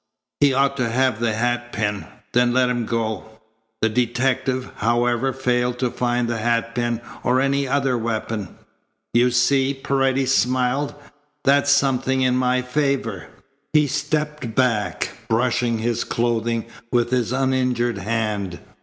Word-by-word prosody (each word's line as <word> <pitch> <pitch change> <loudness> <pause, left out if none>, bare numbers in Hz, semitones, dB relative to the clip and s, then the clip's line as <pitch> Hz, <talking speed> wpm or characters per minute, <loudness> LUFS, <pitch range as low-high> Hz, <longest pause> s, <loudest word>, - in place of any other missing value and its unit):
He 145 -1 +5
ought 140 +1 +2
to 125 -3 0
have 130 -1 +1
the 115 -2 +1
hatpin. 115 -3 -1 0.3
Then 125 0 +3
let 130 -1 +3
him 120 -2 -1
go." 110 -3 -2 0.6
The 110 - +4
detective, 125 +2 0
however, 120 +3 +1
failed 125 -1 0
to 125 -1 -1
find 120 -1 0
the 115 -1 -2
hatpin 115 +1 0 0.2
or 125 +1 +2
any 140 +1 +1
other 135 -1 +1
weapon. 110 -4 -3 0.6
"You 120 +1 +4
see," 135 +3 +2
Paredes 135 -1 +1
smiled. 125 +6 +1 0.5
"That's 140 +1 +3
something 135 -2 +2
in 125 -1 +2
my 125 0 +1
favour." 130 -6 -1 0.5
He 150 -1 +5
stepped 150 -3 -2
back, 120 -5 +1 0.2
brushing 120 0 +1
his 115 +1 -1
clothing 115 -1 -1 0.3
with 120 0 +1
his 125 -3 +1
uninjured 125 -4 0
hand. 105 -4 -2
125 Hz, 130 wpm, -22 LUFS, 115-130 Hz, 0.6 s, He